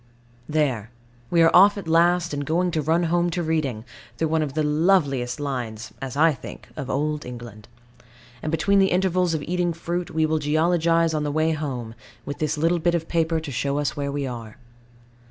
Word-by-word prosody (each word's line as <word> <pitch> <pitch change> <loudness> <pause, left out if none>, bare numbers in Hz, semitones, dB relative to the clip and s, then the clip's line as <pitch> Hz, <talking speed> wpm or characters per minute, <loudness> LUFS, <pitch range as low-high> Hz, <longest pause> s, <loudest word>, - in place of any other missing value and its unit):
There. 135 -8 0 0.4
We 170 -1 +4
are 165 - +4
off 200 +3 +7
at 195 -4 -6
last, 170 0 +3
and 145 0 -2
going 175 +5 0
to 160 -2 0
run 165 +4 +1
home 175 +1 +1
to 175 +1 -2
Reading, 145 -9 -1 0.3
through 160 - 0
one 160 0 +1
of 145 -2 -3
the 155 - +1
loveliest 150 -5 +1
lines 120 -6 -4
(as 135 0 -5
I 160 +1 +5
think) - - -10
of 135 - -6
old 150 +2 -1
England. 120 -3 -9 0.7
And 155 - -3
between 195 +5 +2
the 190 0 +4
intervals 180 -2 +1
of 150 - -3
eating 175 +1 -1
fruit, 170 +1 -3
we 160 0 +1
will 155 0 0
geologize 165 +2 +2
on 155 - 0
the 150 - -1
way 155 +2 +1
home, 130 -7 -4 0.3
with 145 - -6
this 155 0 -1
little 165 +3 +2
bit 170 +1 +1
of 165 -1 -2
paper 165 -1 +1
to 155 -3 -7
show 140 +3 -1
us 140 -5 -1
where 140 -1 -2
we 140 0 -2
are. 115 -4 -7
155 Hz, 200 wpm, -24 LUFS, 140-170 Hz, 0.7 s, off